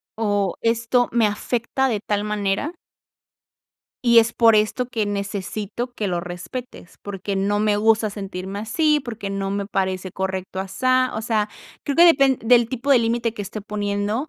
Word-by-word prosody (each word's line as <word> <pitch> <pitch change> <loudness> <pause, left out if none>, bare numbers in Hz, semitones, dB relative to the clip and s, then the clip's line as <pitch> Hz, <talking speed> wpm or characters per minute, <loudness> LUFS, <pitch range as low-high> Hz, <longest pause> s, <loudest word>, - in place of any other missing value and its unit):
o 205 -4 0
esto 230 +2 +1
me 230 -2 +3
afecta 235 +5 -1
de 215 -4 -1
tal 205 -1 -2
manera 210 - -1 1.3
"y 235 -1 +6
es 225 0 +4
por 230 -2 +5
esto 215 +4 +1
que 225 -4 -2
necesito 205 +4 -4
que 210 - -2
lo 175 -1 -1
respetes, 180 +4 -8
porque 200 0 -4
no 205 +2 +1
me 210 -1 +2
gusta 220 0 +3
sentirme 195 0 -6
así, 300 +7 +2
porque 225 -6 -6
no 195 0 -2
me 200 0 -2
parece 190 -2 -2
correcto 190 0 -3
asá". 255 +7 +1
O 220 - -3
sea, 215 -2 0 0.4
creo 280 - -2
que 340 - +8
depend 275 -6 +5
del 240 -1 +5
tipo 260 +2 -3
de 265 - +7
límite 230 0 0
que 205 - -5
esté 210 +2 -6
poniendo, 205 +5 -2
215 Hz, 170 wpm, -22 LUFS, 200-240 Hz, 1.3 s, que